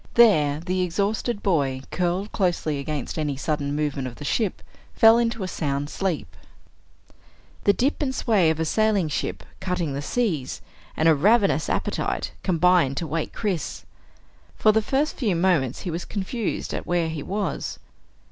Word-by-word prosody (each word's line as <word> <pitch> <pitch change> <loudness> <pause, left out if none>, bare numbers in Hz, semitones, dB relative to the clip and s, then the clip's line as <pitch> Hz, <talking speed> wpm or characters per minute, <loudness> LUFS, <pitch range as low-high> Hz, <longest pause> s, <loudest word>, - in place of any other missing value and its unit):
There 155 -12 +5
the 185 +2 -1
exhausted 200 +5 -1
boy, 140 -8 +1
curled 180 +3 -1
closely 175 -7 0
against 150 +1 -4
any 145 -3 -1
sudden 145 0 -1
movement 145 -3 -1
of 120 - -8
the 145 - -8
ship, 210 +4 -1 0.3
fell 225 +1 +7
into 230 -3 0
a - - -2
sound 145 -4 -2
sleep. 170 - -3 1.3
The 200 - +6
dip 270 +9 0
and 285 - +1
sway 205 -11 +3
of 160 0 0
a 160 - +1
sailing 205 -2 +2
ship 145 - -3 0.2
cutting 180 -6 -2
the 140 - -3
seas, 160 - -1 0.4
and 160 - +3
a 165 - +7
ravenous 195 - +3
appetite, - - -1
combined 175 -6 +3
to 170 - -1
wake 160 0 -2
Chris. 195 -7 -3 0.7
For 215 - +4
the 220 +1 +2
first 275 +7 0
few 215 -9 +1
moments 165 -8 +1
he 180 - -4
was 170 +2 -3
confused 210 +2 -3
at - - -4
where 175 -2 +1
he 160 -2 -4
was. 200 +7 -3
175 Hz, 160 wpm, -24 LUFS, 150-205 Hz, 1.3 s, fell